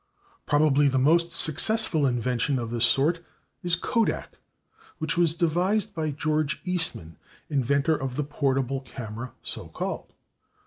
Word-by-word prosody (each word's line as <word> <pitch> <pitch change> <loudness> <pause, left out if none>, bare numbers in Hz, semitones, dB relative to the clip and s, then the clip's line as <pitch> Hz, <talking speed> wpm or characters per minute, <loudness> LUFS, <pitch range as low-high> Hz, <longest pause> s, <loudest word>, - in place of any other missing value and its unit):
Probably 145 -1 +4
the 135 -1 +1
most 170 +6 +3
successful 160 -1 +2
invention 125 +2 0
of 115 -2 -4
this 120 0 +3
sort 160 +8 +2 0.4
is 175 0 +1
/kodak/, 225 +5 0 0.7
which 160 +1 -1
was 170 -2 +2
devised 180 +5 +1
by 155 -1 -2
George 155 +1 -1
Eastman, 165 - -2 0.3
inventor 140 +3 +2
of 130 -1 -4
the 150 - 0
portable 135 -2 0
camera 120 -2 -7
so - - -6
called. - - -5
145 Hz, 130 wpm, -26 LUFS, 130-165 Hz, 0.7 s, Probably